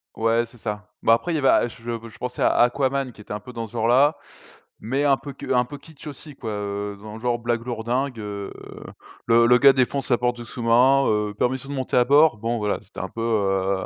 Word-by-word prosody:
Ouais 115 +1 +1
c'est 120 +1 -17
ça. 105 -1 -6
Bah 115 - +5
après 145 +9 0
il - - 0
y - - +1
avait 140 -3 +1
A - - +4
je 115 - -13
je 115 -1 -6
pensais 125 0 -5
à - - +4
Aquaman 130 +2 +1
qui 110 - -15
était 105 - -8
un 105 - -4
peu 125 +5 -12
dans 115 -1 -4
ce 110 - -20
genre 115 -1 0
là. 140 +6 +4 0.6
Mais 130 +6 -1
un 140 -2 +4
peu 140 +2 -9 0.2
un 125 0 +3
peu 145 +4 -9
kitsch 145 +1 -15
aussi 145 0 -9
quoi, 115 -5 -6
heu, 100 0 -4
dans 105 0 -9
le - - -9
genre 120 0 -1
blague 120 0 -2
lourd 120 -3 -4
dingue, 125 +1 -1
heu, 100 -1 -6 0.8
le 115 0 +5
le 125 +1 +6
gars 140 +1 +7
défonce 135 +1 0
la 120 - +5
porte 125 0 0
du 120 - -8
sous-marin, 125 +4 +3
heu, 105 -1 0
permission 130 +5 -1
de - - -4
monter 130 -2 -1
à 125 - +5
bord, 145 -1 +5
bon 115 +3 -2
voilà, 105 -1 -1
c'était - - -12
un - - -4
peu, 115 - -7
heu 95 -4 0
120 Hz, 250 wpm, -23 LUFS, 110-130 Hz, 0.8 s, gars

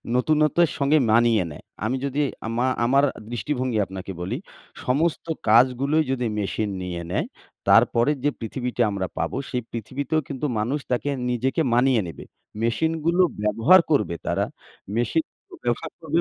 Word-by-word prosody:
নতুনত্বের 155 +4 +3
সঙ্গে 145 +2 +3
মানিয়ে 115 -2 +4
নেয়। 75 - -11 0.2
আমি 120 +4 0
যদি 140 +1 -2 0.3
আমা 120 +3 0 0.2
আমার 135 +3 +4 0.3
দৃষ্টিভঙ্গি 125 0 -1
আপনাকে 95 0 -7
বলি, 90 - -2 0.5
সমস্ত 150 +6 +1 0.2
কাজগুলোই 130 +7 +4
যদি 125 -2 -1
মেশিন 105 +1 -1
নিয়ে 90 -1 -4
নেয়, - - 0 0.4
তারপরের 140 +5 +4
যে - - +5
পৃথিবীটা 125 +1 -2
আমরা 95 -2 -2
পাবো - - -2
সেই 125 - -1
পৃথিবীতেও 140 +7 -2
কিন্তু 140 0 -3
মানুষ 125 +8 -1
তাকে 125 +3 0 0.2
নিজেকে 130 +6 0
মানিয়ে 125 -1 +4
নেবে। 80 - -8 0.4
মেশিনগুলো 160 +8 +1 0.2
ব্যবহার 115 - +5
করবে 105 - +2
তারা। - - 0 0.5
মেশিনগুলো 120 +8 -2
ব্যবহার 120 +7 -1
করবে 165 0 0
125 Hz, 135 wpm, -24 LUFS, 115-150 Hz, 0.5 s, যে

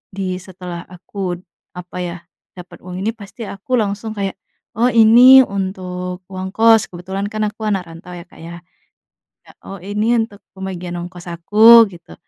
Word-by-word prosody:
di 195 - -3 0.2
setelah 180 -2 -8
aku 180 0 -6
d - - -23 0.3
apa 180 0 -9
ya, 175 0 -5 0.4
dapat 180 0 -12
uang 180 0 -7
ini 225 - 0
pasti 225 +2 -10
aku 200 +7 -3
langsung 210 +1 -3
kayak, 195 -1 -3 0.4
oh 245 +2 +3
ini 240 +4 +8
untuk 185 -3 -5
uang 185 0 -5
kos, 225 -1 +5
kebetulan 190 +3 -5
kan 215 0 -2
aku 215 +1 -8
anak 195 -3 -1
rantau 165 +2 -12
ya 170 - -10
Kak - - -19
ya. 170 +1 -9 0.9
Ya, - - -16
oh 195 - -8
ini 210 +6 0
untuk 220 -2 -4 0.2
pembagian 180 -2 -6
ongkos 175 0 -9
aku 220 +7 +7
gitu. 170 -2 -14
190 Hz, 165 wpm, -18 LUFS, 180-215 Hz, 0.9 s, ini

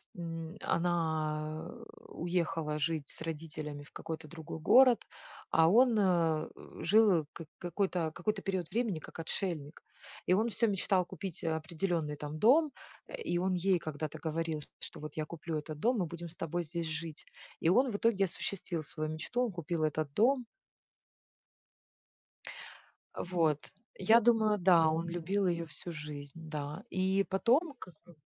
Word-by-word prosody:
м, 165 -1 -5
она, 155 -2 0
э, 235 -1 -11 0.3
уехала 165 -3 -1
жить 150 -1 -1
с - - -12
родителями 155 -2 -5
в 145 - -17
какой-то 160 -1 -6
другой 160 +1 -8
город, 245 +7 +6 0.5
а 160 0 +5
он, 235 +3 +5
э, 170 -5 +2 0.4
жил, 195 -5 +5
как 165 - -9
какой-то 175 -2 -1
какой-то 195 +3 -1
период 185 -4 -2
времени, 225 -7 0
как 155 - -11
отшельник. 165 -3 -3 0.5
И - - +5
он 220 +5 +3
всё 230 +2 +2
мечтал 190 -2 +2
купить 185 -2 -6
определенный 160 0 -1
там 150 +1 -6
дом. 280 - +5 0.4
Э, - - -6
и 175 - 0
он 185 +1 +1
ей 180 0 +2
когда-то 155 -1 -5
говорил, 160 -1 -2 0.2
что - - -8
вот 150 -1 -7
я 155 - -1
куплю 165 0 -4
этот 150 0 -6
дом, 245 +5 +2
мы 185 - +1
будем 170 +1 -7
с 170 - -4
тобой 175 +2 -2
здесь 170 +1 -4
жить. 160 0 -5 0.3
И 165 - +3
он 250 +7 +4
в - - -4
итоге 210 -3 +3
осуществил 175 -2 -3
свою 155 +1 -3
мечту. 160 +11 -1
Он 235 - -3
купил 170 -2 -2
этот 155 -2 -1
дом. 250 - +3 2.7
Э, - - -4
вот. 165 -5 0 0.3
Я 225 +1 +6
думаю, 220 -2 +4
да, 175 -4 +5
он 165 +2 -1
любил 180 +3 0
ее 170 -1 0
всю 155 +4 -3
жизнь, 150 -2 -7 0.2
да, 150 0 -4
и 190 +1 +2
потом 255 - +2
к 180 - -10
к 175 - -17
170 Hz, 155 wpm, -32 LUFS, 155-195 Hz, 2.7 s, город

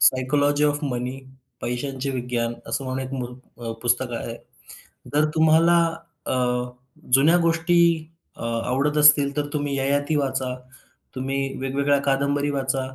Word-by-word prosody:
Psychology 145 +3 +3
of 145 0 +1
मनी, 125 0 -3 0.4
पैशांचे 135 +2 -3
विज्ञान 120 -2 -2
असं. 135 - -3
म्हणून 130 0 -3
एक 130 - -10
मु 125 -2 -7
पुस्तक 120 +1 +1
आहे. 115 - -6 0.8
जर 150 +1 +4
तुम्हाला 160 +2 +5 0.5
अ, - - 0 0.8
जुन्या 150 +6 +6
गोष्टी 170 +1 +2 0.6
अ, - - -11 0.2
आवडत 145 +4 0
असतील, 145 -1 +5
तर 145 - 0
तुम्ही 145 -2 -1
ययाती 145 +3 0
वाचा, 135 -2 -1 0.6
तुम्ही 135 +1 -2 0.2
वेगवेगळ्या 140 +2 +1
कादंबरी 140 +1 +1
वाचा. 135 -1 -1
140 Hz, 125 wpm, -23 LUFS, 130-145 Hz, 0.8 s, जुन्या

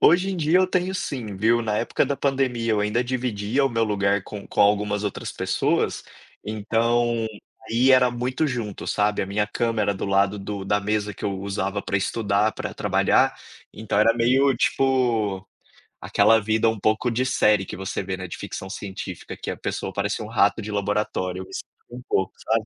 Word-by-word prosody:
Hoje 180 +4 +5
em 190 - -3
dia 165 +3 +3
eu 185 - +4
tenho 185 +1 -1
sim 120 - -4
viu, 115 +4 +3
na 105 -2 -1
época 120 - +1
da 140 +1 -2
pandemia 130 -5 0
eu 105 - +1
ainda 105 +4 0
dividia 125 0 -1
o - - +3
meu 115 -2 +1
lugar 100 -2 +1
com 105 -2 -8
com - - -2
algumas 105 0 +2
outras 100 - -4
pessoas, - - 0 0.4
então 115 +2 0 0.4
aí 125 +4 +4
era 125 -1 +5
muito 125 +5 -1
junto, 120 -7 -4
sabe, 105 0 +1
a 95 - -4
minha 105 +2 0
câmera 110 -2 0
do - - -4
lado 100 +1 +2
do 100 0 -5
da 105 +1 +1
mesa 105 0 -1
que - - -9
eu 100 - 0
usava 100 0 -2
para 100 - -1
estudar, 105 +1 +1
para - - -6
trabalhar, - - +2 0.4
então 110 -2 -2
era 110 +2 +5
meio 130 +4 +3
tipo, 115 -8 +1 0.6
aquela 115 0 +4
vida 110 +2 +1
um 110 -1 0
pouco 110 +4 +1
de 120 +3 0
série 105 -6 +3
que - - -7
você 95 0 -3
vê, 95 0 -4
né, 95 0 -6
de 85 - -7
ficção 95 - -6
científica 95 -3 -7
que - - -4
a - - -6
pessoa 95 - -4
parecia 100 +2 -2
um - - -8
rato 105 -3 +2
de 105 - -5
laboratório, 100 -3 -1
eu - - -8
me - - -15
sinto - - -5 0.3
um 125 +1 -8
pouco, 95 -1 0
sabe. 110 -1 +1
110 Hz, 195 wpm, -24 LUFS, 100-120 Hz, 0.6 s, Hoje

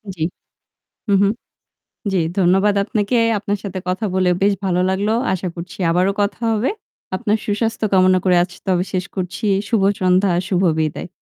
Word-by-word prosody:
জি। 160 - -11 0.9
হুম, 200 -1 +4
হুম। 200 - +3 0.8
জি, 190 - +2 0.2
ধন্যবাদ 195 +3 +3
আপনাকে। 215 +4 0 0.2
আপনার 205 0 -2
সাথে 190 -1 -4
কথা 190 +4 -1
বলে 185 -1 +2
বেশ 200 0 +4
ভালো 180 -1 +1
লাগলো। 200 +3 0 0.2
আশা 185 0 -2
করছি 175 +3 -8
আবারো 180 +3 +2
কথা 205 +3 -1
হবে। 220 +4 +1 0.4
আপনার 210 +2 +1
সুস্বাস্থ্য 220 +1 -1
কামনা 185 0 +5
করে 180 -1 +4
আজ 180 - -3 0.2
তবে 180 -1 +1
শেষ 185 -1 -1
করছি। 185 +3 -4 0.2
শুভ 220 -4 +1 0.2
সন্ধ্যা, 185 +1 +3 0.2
শুভ 185 -1 +1 0.2
বিদায়। 155 +3 -2
190 Hz, 160 wpm, -19 LUFS, 180-205 Hz, 0.9 s, কামনা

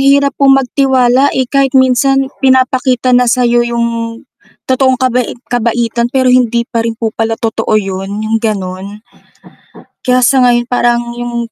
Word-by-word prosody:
hirap 280 +1 +3
po 275 - +4
magtiwala, 265 -1 +2
eh, 260 - +1
kahit 275 0 +1
minsan 265 +1 +2
pinapakita 260 -1 +1
na 245 0 +3
sa'yo 240 0 +2
'yong 235 0 -1 0.8
totoong 260 0 +2
kabai 250 -1 -1 0.2
kabaitan, 235 0 -1
pero 260 0 0
hindi 240 -2 +1
pa 230 -1 -3
rin 230 -1 -3
po 225 -1 -3
pala 225 0 -2
totoo 225 -1 -1
'yon. 195 +1 -4
'Yong 225 +1 0
ganun. 190 -4 -4 1.2
Kaya 255 0 +2
sa 255 +1 +3
ngayon 240 0 +2
parang 240 -1 +1 0.2
'yong 235 -1 -5
245 Hz, 145 wpm, -12 LUFS, 230-260 Hz, 1.2 s, po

